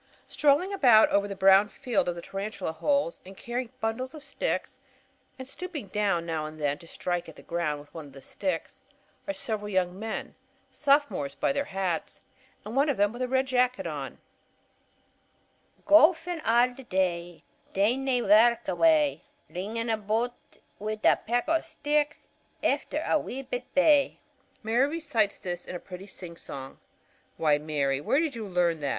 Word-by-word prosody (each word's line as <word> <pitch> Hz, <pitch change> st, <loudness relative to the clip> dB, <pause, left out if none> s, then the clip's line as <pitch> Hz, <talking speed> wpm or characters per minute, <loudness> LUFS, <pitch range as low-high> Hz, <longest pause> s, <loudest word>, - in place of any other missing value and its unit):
Strolling 300 Hz, +7 st, +2 dB
about 245 Hz, -, +6 dB
over 200 Hz, 0 st, +2 dB
the 200 Hz, -, -5 dB
brown 195 Hz, +1 st, +6 dB
field 220 Hz, -3 st, -1 dB
of 175 Hz, -, -2 dB
the 170 Hz, -, -8 dB
tarantula 195 Hz, -3 st, -4 dB
holes 280 Hz, -, 0 dB
and 190 Hz, +1 st, -12 dB
carrying 240 Hz, 0 st, -4 dB
bundles 255 Hz, +5 st, -3 dB
of 300 Hz, -, -10 dB
sticks, 280 Hz, -, -3 dB, 0.6 s
and 260 Hz, -1 st, -8 dB
stooping 300 Hz, -, -6 dB
down 195 Hz, -5 st, 0 dB
now 160 Hz, -2 st, -2 dB
and 155 Hz, 0 st, -10 dB
then 145 Hz, -1 st, 0 dB
to 165 Hz, -, -14 dB
strike 175 Hz, 0 st, -3 dB
at 160 Hz, -, -12 dB
the -, -, -14 dB
ground 165 Hz, -4 st, -2 dB
with 145 Hz, 0 st, -16 dB
one 160 Hz, -3 st, -8 dB
of 140 Hz, -, -16 dB
the 135 Hz, -, -11 dB
sticks, 180 Hz, +5 st, -4 dB, 0.5 s
are 295 Hz, -, -1 dB
several 210 Hz, -2 st, -3 dB
young 185 Hz, -1 st, 0 dB
men, 220 Hz, 0 st, -4 dB, 0.4 s
Sophomores 275 Hz, -, +1 dB
by -, -, +1 dB
their 280 Hz, 0 st, -1 dB
hats, 185 Hz, -4 st, -3 dB, 0.5 s
and 215 Hz, +3 st, -6 dB
one 280 Hz, +2 st, +3 dB
of 280 Hz, -, 0 dB
them 205 Hz, +2 st, +2 dB
with 240 Hz, -, -7 dB
a 255 Hz, -, 0 dB
red 260 Hz, +1 st, +2 dB
jacket 255 Hz, -1 st, +1 dB
on: -, -, -5 dB, 1.7 s
"Gowfin' 325 Hz, +2 st, +5 dB
a' 240 Hz, +2 st, +3 dB
the 265 Hz, -, -11 dB
day, 175 Hz, -5 st, -1 dB, 0.3 s
Daein' 225 Hz, +7 st, +2 dB
nae 255 Hz, -3 st, +1 dB
wark 230 Hz, +4 st, +5 dB
ava'; 160 Hz, -4 st, +3 dB, 0.3 s
Rinnin' 225 Hz, +5 st, -2 dB
aboot 220 Hz, +3 st, 0 dB, 0.5 s
wi' 215 Hz, +1 st, -3 dB
a -, -, +6 dB
peck 240 Hz, +3 st, -1 dB
o' 325 Hz, +1 st, +3 dB
sticks 295 Hz, -1 st, -1 dB, 0.4 s
Efter -, -, 0 dB
a -, -, +3 dB
wee 270 Hz, +2 st, -6 dB
bit 250 Hz, -1 st, -4 dB
ba'!" 285 Hz, 0 st, +4 dB, 0.5 s
Mary 235 Hz, +5 st, +3 dB
recites 290 Hz, -10 st, 0 dB
this 175 Hz, -1 st, -5 dB
in -, -, -7 dB
a -, -, -4 dB
pretty 185 Hz, +2 st, -10 dB
singsong. 165 Hz, -8 st, -8 dB, 0.6 s
"Why, 150 Hz, -2 st, +3 dB
Mary, 145 Hz, -3 st, -1 dB
where 270 Hz, -, +2 dB
did 315 Hz, -5 st, -1 dB
you 220 Hz, -2 st, -5 dB
learn 175 Hz, -3 st, +1 dB
that?" 145 Hz, -2 st, -2 dB
210 Hz, 170 wpm, -28 LUFS, 175-260 Hz, 1.7 s, about